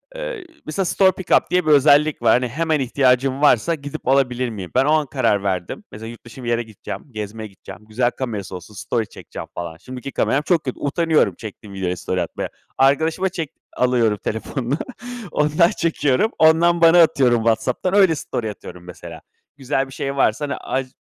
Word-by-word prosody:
eee, - - -5 0.2
mesela 180 +5 -2
store 190 +1 +4
pick 185 -1 -9
up - - -3
diye 180 -2 +2
bir 155 - +3
özellik 145 0 +5
var. 115 -1 +5
Hani, 125 0 +2
“hemen 155 +4 0
ihtiyacın 130 +1 +1
varsa, 150 +3 +4
gidip 145 -3 -8
alabilir 130 -2 +2
miyim?“ 95 -5 -7
Ben 130 +2 +4
o 150 - +2
an 155 -1 +3
karar 105 -8 +1
verdim. 90 -3 -3
Mesela, 110 +2 -8
yurt 120 - -12
dışı 120 +2 -11
bir 120 - -3
yere 120 0 +1
gideceğim, 105 -2 -8
gezmeye 110 0 -6
gideceğim, 100 +1 -13
güzel 120 +3 0
kamerası 105 -8 -5
olsun 90 +4 -10
story 110 +1 -2
çekeceğim - - -9
falan, 85 -2 -6
şimdiki 130 +5 -8
kameram 140 +2 +1
çok 165 0 +1
kötü, 130 - -5
utanıyorum, 160 +2 +1
çektiğim 105 -3 -10
videoyla 90 -2 -2
story 90 +1 -2
atmaya. 85 - -4 0.3
Arkadaşıma 160 +7 +2
çek 165 -5 -4 0.3
alıyorum 120 -4 +2
telefonunu, 125 +5 -2 0.5
ondan 150 +4 +3
çekiyorum. 165 - +1
Ondan 170 +2 +4
bana 165 +1 +7
atıyorum 130 -6 +4
WhatsApp'tan, 115 - 0
öyle 190 -5 +5
story 110 -5 -4
atıyorum 90 -3 -11
mesela. 90 0 -10 0.4
Güzel 135 0 -1
bir 135 - -12
şey 140 +1 -3
varsa, 135 +2 +1
hani, 140 - -3
aç 130 0 -3
130 Hz, 185 wpm, -21 LUFS, 110-155 Hz, 0.5 s, bana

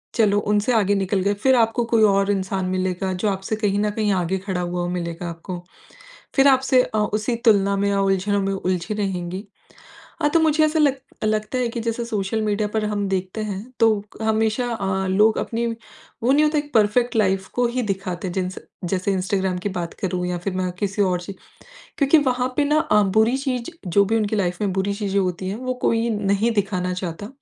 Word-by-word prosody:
चलो 210 -3 +3
उनसे 210 +4 +2
आगे 205 -2 +3
निकल 195 0 0
गए, 200 +2 +1
फिर 260 +6 +3
आपको 230 0 +2
कोई 230 -1 +3
और 200 -1 +3
इंसान 190 -1 -1
मिलेगा 185 0 -1
जो 185 +4 -1
आपसे 195 +2 -2
कहीं 205 -2 0
न 210 0 +1
कहीं 210 -1 0
आगे 185 0 0
खड़ा 185 -2 -3
हुआ 175 0 -2
मिलेगा 170 -1 -4
आपको। 170 +2 -7 0.8
फिर 270 0 +5
आपसे 265 -1 +4
अ, 215 - -4
उसी 215 +2 0
तुलना 200 -2 +4
में 200 +1 +1
या 200 0 +1
उलझनो 195 +1 +1
में 195 0 -1
उलझी 185 0 -2
रहेंगी, 190 -1 -3 0.8
हाँ 295 - +4
तो 330 - +3
मुझे 315 -1 +3
ऐसा 310 +1 +1
लग 280 -3 +3 0.3
लगता 215 +3 0
है 245 -2 0
कि 235 0 -4
जैसे 230 +1 -2
सोशल 215 -1 -2
मीडिया 210 0 0
पर 215 0 -1
हम 205 -1 -1
देखते 190 +2 -2
हैं 210 +5 -6
तो 220 -3 +4 0.2
हमेशा 220 +2 +1
अ, 190 -2 -1
लोग 210 +3 +3
अपनी 235 +1 -2 0.6
वो 255 +3 +3
नहीं 300 +2 +4
होता 300 0 +2
एक 290 0 -4
परफ़ेक्ट 225 +3 +3
लाइफ़ 190 -3 +1
को 245 0 +2
ही 250 +1 -2
दिखाते 190 -3 -3
हैं, 175 - -5
जिनसे 185 0 -3 0.3
जैसे 190 +2 0
इंस्टाग्राम 190 0 0
की 205 - -3
बात 175 -3 -4
करूँ 180 -2 -1
या 180 0 -2
फिर 185 +3 -3
मैं 185 -1 -1
किसी 200 +1 0
और 180 -2 +1
ची 195 +3 -7 0.7
क्योंकि 285 +2 +5
वहाँ 255 -3 +1
पे 295 - +3
ना 300 +2 +2
अ, 260 -10 +3
बुरी 220 +5 +3
चीज़ 265 0 -3 0.2
जो 200 +4 +4
भी 220 +3 0
उनकी 215 -1 0
लाइफ 180 -2 -1
में 195 -2 0
बुरी 195 +1 -1
चीज़ें 200 -1 0
होती 185 0 -2
हैं, 200 - -3
वो 255 +1 -3
कोई 230 +1 +2
नहीं 205 +1 +1
दिखाना 185 -3 -1
चाहता। 185 +2 -5
205 Hz, 210 wpm, -22 LUFS, 190-225 Hz, 0.8 s, फिर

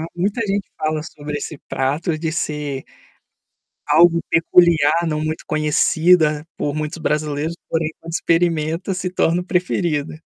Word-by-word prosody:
Muita 200 +6 -1
gente 200 -1 -1
fala 155 0 -1
sobre 150 -2 -6
esse 150 +1 -6
prato 150 +5 -1
de 160 0 -2
ser, 150 -4 -3 1.0
algo 170 +3 +5
peculiar, 165 -1 +4
não 155 -1 -1
muito 155 +1 -3
conhecida 155 +1 +3
por 145 - -2
muitos 155 +2 -3
brasileiros, 150 +1 -1
porém 160 -1 -1
quando 165 0 -9
experimenta 165 +2 0
se 180 0 -3
torna 180 -1 +1
o - - -10
preferido. 175 -5 -1
160 Hz, 135 wpm, -20 LUFS, 150-175 Hz, 1.0 s, algo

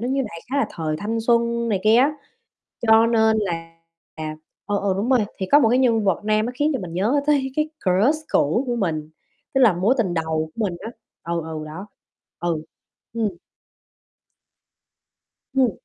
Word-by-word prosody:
nó 245 - -2
như 270 0 +1
đại 170 -3 -9
khái 280 - 0
là - - +2
thời 155 -2 -3
thanh 225 +2 -2
xuân 235 0 +1
này 200 -4 0
kia 220 +2 +6
á, 275 +4 +4 0.7
cho 225 0 +6
nên 220 -1 +3
là 165 -4 -4 0.9
ừ, 205 -1 0
ừ, 195 -2 0
đúng 215 +5 -1
rồi. 255 - +5 0.2
Thì 190 - -2
có 290 - +9
một 230 - +4
cái 245 +3 +3
nhân 230 -4 +3
vật 195 +1 0
nam 215 +1 +2
nó 245 - -4
khiến 290 +4 +1
cho 260 - -1
mình 175 -3 -7
nhớ 225 +10 +2
tới 275 -3 +2
cái 305 0 +1 0.2
crush 205 +11 +3
cũ 195 - +2
của 240 -1 -1
mình, 155 -7 -2 0.4
tức 270 - +3
là 230 -7 +6
mối 195 +9 +2
tình 190 -7 0
đầu 160 -1 -1
của 230 - -1
mình 180 -4 -2
á, 225 - -6 0.4
ừ, 170 - 0
ừ, 155 -1 -6
đó, 165 +6 -8 0.5
ừ, 170 -3 -2 0.5
ừm. 225 -1 0 2.3
Ừm. 260 -4 +3
220 Hz, 190 wpm, -22 LUFS, 175-240 Hz, 2.3 s, có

